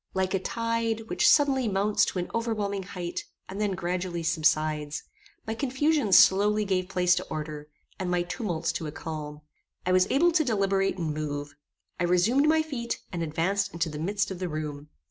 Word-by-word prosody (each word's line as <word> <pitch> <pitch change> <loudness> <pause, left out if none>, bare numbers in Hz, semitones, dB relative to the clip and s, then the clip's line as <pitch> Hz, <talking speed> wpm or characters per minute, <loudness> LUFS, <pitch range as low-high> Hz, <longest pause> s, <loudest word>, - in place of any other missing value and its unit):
Like 190 0 0
a 195 - +2
tide, 230 +2 -1
which - - +4
suddenly 270 -4 +4
mounts 205 +1 +2
to - - -4
an 180 - -3
overwhelming 215 -4 -1
height, 180 -2 -5 0.2
and 195 +2 -5
then 205 -2 +1
gradually 180 -1 -3
subsides, 155 -2 +1 0.4
my 220 - -2
confusion 275 0 +1
slowly 205 +3 +6
gave 185 -1 -1
place 180 -2 +3
to 180 0 0
order, 150 -1 -5 0.3
and 185 -1 -2
my 175 -1 +1
tumults 175 -4 -2
to 160 - -4
a - - -5
calm. 150 -1 -6 0.4
I 180 - +1
was 185 0 +4
able 340 +6 +4
to 320 -1 +3
deliberate 195 -6 +1
and 160 -4 -2
move. 145 -1 -4 0.5
I 175 - +2
resumed 220 +12 +3
my 315 0 +4
feet, 245 -7 -4
and 175 -3 -3
advanced 185 +5 0
into 165 0 -1
the 150 -1 -6
midst 195 +4 -1
of 185 - -5
the 180 -1 -2
room. 150 -2 -5
185 Hz, 185 wpm, -27 LUFS, 165-215 Hz, 0.5 s, slowly